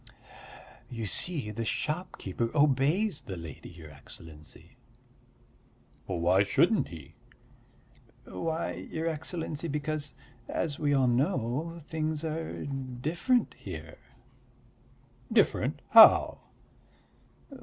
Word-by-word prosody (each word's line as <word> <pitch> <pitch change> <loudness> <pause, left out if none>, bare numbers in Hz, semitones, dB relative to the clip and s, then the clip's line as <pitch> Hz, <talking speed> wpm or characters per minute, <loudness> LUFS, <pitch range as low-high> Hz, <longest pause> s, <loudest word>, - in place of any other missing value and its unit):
"You 115 -2 -5
see, 135 - 0
the 115 +2 -3
shopkeeper 120 - -3
obeys 145 +6 +2
the 95 - -7
lady, 80 -4 -9
your 80 -3 -12
Excellency." 75 +1 -12 1.3
"Why 90 +3 +2
shouldn't 170 - +3
he?" 80 -5 -11 1.1
"Why, 160 - -3 0.2
your 160 +1 -3
Excellency, 160 0 -3
because, 150 -1 -3 0.3
as 150 -4 -2
we 145 -2 +1
all 135 -1 +3
know, 135 - 0
things 155 -1 -2
are 160 +1 -4
different 140 - -1
here." - - -8 1.3
"Different? - - +2
How?" - - +8
145 Hz, 90 wpm, -29 LUFS, 105-160 Hz, 1.3 s, How